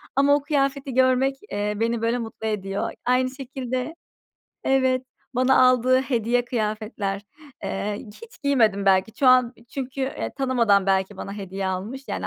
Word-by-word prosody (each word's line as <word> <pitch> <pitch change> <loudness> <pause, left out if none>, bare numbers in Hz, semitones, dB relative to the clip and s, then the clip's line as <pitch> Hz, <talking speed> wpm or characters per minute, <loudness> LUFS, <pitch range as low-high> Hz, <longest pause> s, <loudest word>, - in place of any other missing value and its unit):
ama 280 +1 +5
o 290 - 0
kıyafeti 275 -2 -1
görmek, 260 +1 +3 0.2
eee, 205 +1 -1
beni 230 0 0
böyle 230 +2 +1
mutlu 225 -1 -5
ediyor. 195 -2 -2
Aynı 255 +1 +2
şekilde, 260 +1 -5 0.7
evet, 260 -1 +2 0.3
bana 255 +1 +4
aldığı 255 +1 +3
hediye 245 -2 0
kıyafetler. 215 -3 -2 0.4
Eee, 205 +1 -2
hiç 445 - -14
giymedim 220 -8 +2
belki. 190 +3 +3
Şu 270 - +2
an 255 -1 +5 0.2
çünkü, 270 0 -4
eee, 265 +1 -2
tanımadan 235 -8 +3
belki 190 +1 +1
bana 195 - -6
hediye 195 -1 -5
almış, 200 +9 -4
yani - - -3
245 Hz, 145 wpm, -24 LUFS, 210-265 Hz, 0.7 s, ama